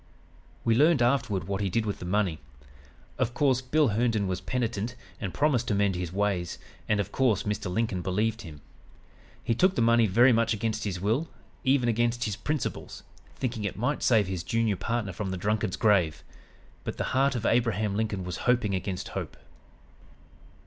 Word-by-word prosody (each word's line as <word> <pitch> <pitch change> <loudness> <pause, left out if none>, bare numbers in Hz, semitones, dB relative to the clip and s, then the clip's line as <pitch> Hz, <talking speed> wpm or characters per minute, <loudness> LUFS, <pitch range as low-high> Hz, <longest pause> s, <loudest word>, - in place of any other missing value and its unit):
"We 115 - +4
learned 145 +2 +4
afterward 120 - +1
what 100 +3 -3
he 100 - 0
did 110 +4 0
with 105 - -3
the - - -7
money. 95 -4 0 0.8
Of 120 -2 0
course, 130 -2 +2
Bill 145 +2 +2
Herndon 110 -1 +1
was 95 -1 -2
penitent 120 -2 -2 0.2
and 95 - -3
promised 130 - +1
to 105 - +1
mend 100 -1 +2
his 90 -2 -4
ways, 95 -3 -1 0.3
and, 105 -1 +2
of 100 0 -2
course, 125 -7 +2
Mr. 105 -2 -3
Lincoln 110 -3 -1
believed 110 +5 -1
him. 75 -7 -10 0.8
He 115 - +1
took 185 +10 +3
the - - +1
money 115 -1 +4
very 120 +6 +5
much 115 0 +2
against 110 +1 -2
his 95 -3 -3
will, 115 - 0 0.3
even 130 -2 +3
against 120 +1 +1
his 105 -5 -2
principles 150 +3 -4 0.3
thinking 120 -4 -3
it 100 - -3
might 130 +7 -1
save 110 -4 +4
his 95 -2 -3
junior 110 +3 0
partner 110 -1 -2
from 95 +2 -4
the 95 - -3
drunkard's 105 0 -1
grave. 90 -8 +2 0.6
But - - -5
the - - -1
heart 135 +1 +3
of 115 -2 -3
Abraham 110 -3 +1
Lincoln 105 -3 -1
was 90 -1 -4
hoping 120 -5 +2
against 95 0 -3
hope." - - -5
110 Hz, 180 wpm, -28 LUFS, 100-120 Hz, 0.8 s, very